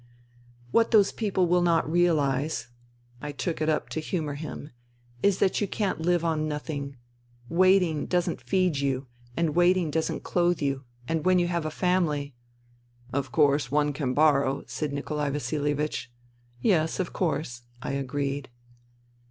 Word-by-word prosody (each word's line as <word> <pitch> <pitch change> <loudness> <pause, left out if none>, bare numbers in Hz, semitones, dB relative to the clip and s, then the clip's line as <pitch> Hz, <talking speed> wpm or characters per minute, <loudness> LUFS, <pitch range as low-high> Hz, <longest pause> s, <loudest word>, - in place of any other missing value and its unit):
" 120 0 -27
What 230 0 +4
those 210 -4 +5
people 195 -4 0
will 175 +1 +3
not 170 -2 +3
reahze," 155 -5 +1 0.5
I 150 - -4
took 155 +3 -3
it 155 - +1
up 155 - 0
to - - -3
humour 155 -2 -2
him, 150 0 -7 0.3
" 120 0 -30
is 200 -2 +3
that 190 +1 +1
you 205 - +1
can't 195 -4 -2
live 175 0 +1
on 155 -2 0
nothing. 145 -2 -4 0.5
Waiting 180 -3 +3
doesn't 175 -1 0
feed 185 -6 +1
you, 135 -1 -1 0.3
and 165 -2 +1
waiting 175 -1 +3
doesn't 160 +2 -1
clothe 175 -1 +1
you; 140 -2 -2 0.2
and 165 -2 -1
when 185 +1 +4
you 175 - +3
have 170 -3 -1
a - - -1
family 155 -5 0 0.3
" 120 0 -34
" 120 +1 -24
Of 135 -2 -2
course, 140 0 +3
one 145 0 +2
can 135 -3 -2
borrow," 140 -3 +3
said 150 -2 -3
Nikolai 145 +1 -2
Vasilievich. 145 -2 -2 0.3
" 120 0 -34
Yes, 165 -7 +2
of 180 - -2
course," 145 -8 -2 0.2
I - - -3
agreed. 140 0 -2
150 Hz, 165 wpm, -27 LUFS, 140-175 Hz, 0.5 s, those